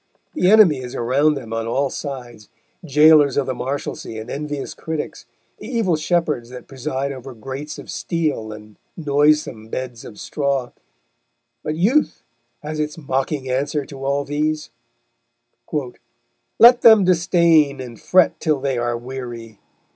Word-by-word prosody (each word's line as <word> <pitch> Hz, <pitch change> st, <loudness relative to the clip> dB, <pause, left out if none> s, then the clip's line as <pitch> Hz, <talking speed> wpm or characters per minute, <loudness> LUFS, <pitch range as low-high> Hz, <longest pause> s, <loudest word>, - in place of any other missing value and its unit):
The 185 Hz, -, +2 dB
enemy 200 Hz, -10 st, +6 dB
is 125 Hz, -1 st, -7 dB
around 140 Hz, +6 st, +2 dB
them 115 Hz, -5 st, -7 dB
on 115 Hz, 0 st, -2 dB
all 135 Hz, +3 st, 0 dB
sides, 125 Hz, -7 st, -7 dB, 0.3 s
jailers 150 Hz, -2 st, +5 dB
of 140 Hz, -, +2 dB
the 130 Hz, -, -2 dB
Marshalsea 125 Hz, -3 st, -5 dB
and 110 Hz, -, -8 dB
envious 145 Hz, -1 st, -4 dB
critics, 160 Hz, -6 st, -6 dB, 0.3 s
the 210 Hz, -, -9 dB
evil 225 Hz, -9 st, +1 dB
shepherds 155 Hz, -6 st, -1 dB
that 125 Hz, 0 st, -10 dB
preside 135 Hz, 0 st, -3 dB
over 130 Hz, -1 st, -9 dB
grates 135 Hz, +6 st, -7 dB
of -, -, -9 dB
steel 155 Hz, -10 st, -2 dB
and 105 Hz, 0 st, -12 dB, 0.2 s
noisome 145 Hz, -6 st, +1 dB
beds 125 Hz, 0 st, -6 dB
of 105 Hz, -, -11 dB
straw, 140 Hz, -4 st, -2 dB, 0.9 s
but 155 Hz, -, -2 dB
Youth 230 Hz, -, +1 dB, 0.4 s
has 155 Hz, +1 st, -5 dB
its 150 Hz, +1 st, -3 dB
mocking 135 Hz, -1 st, -2 dB
answer 140 Hz, +3 st, -1 dB
to 135 Hz, -1 st, -10 dB
all 140 Hz, +1 st, 0 dB
these: 150 Hz, +1 st, -2 dB, 1.0 s
_Let 150 Hz, -, +1 dB
them 220 Hz, -3 st, +8 dB
disdain 170 Hz, -5 st, +3 dB
and 120 Hz, -4 st, -9 dB
fret 185 Hz, -1 st, +3 dB
till 155 Hz, -3 st, 0 dB
they 135 Hz, -2 st, -1 dB
are 120 Hz, 0 st, -1 dB
weary! 120 Hz, -3 st, -8 dB
140 Hz, 140 wpm, -20 LUFS, 125-155 Hz, 1.0 s, them